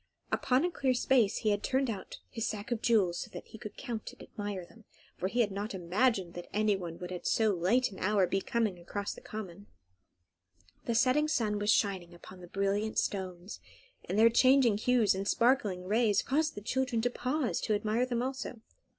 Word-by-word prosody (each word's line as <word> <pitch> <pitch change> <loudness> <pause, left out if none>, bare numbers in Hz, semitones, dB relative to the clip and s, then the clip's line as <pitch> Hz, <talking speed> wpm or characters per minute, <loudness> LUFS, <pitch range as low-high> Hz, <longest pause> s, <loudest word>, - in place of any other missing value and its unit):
Upon 260 +5 +2
a 360 - -1
clear 265 -6 0
space 245 -4 +3
he 215 - +1
had 205 0 0
turned 265 0 +1
out 210 -5 -5
his 225 -3 -3
sack 210 +2 -5
of 235 -2 -1
jewels, 195 -7 +2
so - - -5
that 175 - -8
he 220 - -11
could 210 - -9
count 235 -5 -5
and - - -13
admire 205 -4 -5
them, 225 +6 -19 0.3
for 185 - -2
he 240 +5 +1
had 210 -3 +1
not 200 +1 -4
imagined 190 +1 +1
that 175 0 -8
anybody 195 -6 0
would 180 0 -7
at 180 - -4
so 220 -2 +3
late 200 +9 +2
an 190 - -10
hour 200 -1 +3
be 195 +2 -1
coming 215 -6 -1
across 200 +4 -4
the - - -12
common. 200 -2 -8 1.2
The 235 - -1
setting 260 +6 +3
sun 215 -8 0
was 205 0 -1
shining 190 -6 +1
upon 180 +2 -13
the 175 - -10
brilliant 200 +3 -1
stones, 185 0 -3 0.4
and 195 - -3
their 230 +1 +6
changing 255 -3 +5
hues 240 -2 +3
and 195 +1 -3
sparkling 230 -8 +2
rays 210 +1 +2
caused 305 +3 0
the 205 - -6
children 255 +2 -1
to 245 - +1
pause 255 +2 -1
to 215 - +1
admire 220 +4 0
them 240 -1 -1
also. 260 -2 -4
215 Hz, 200 wpm, -31 LUFS, 195-245 Hz, 1.2 s, their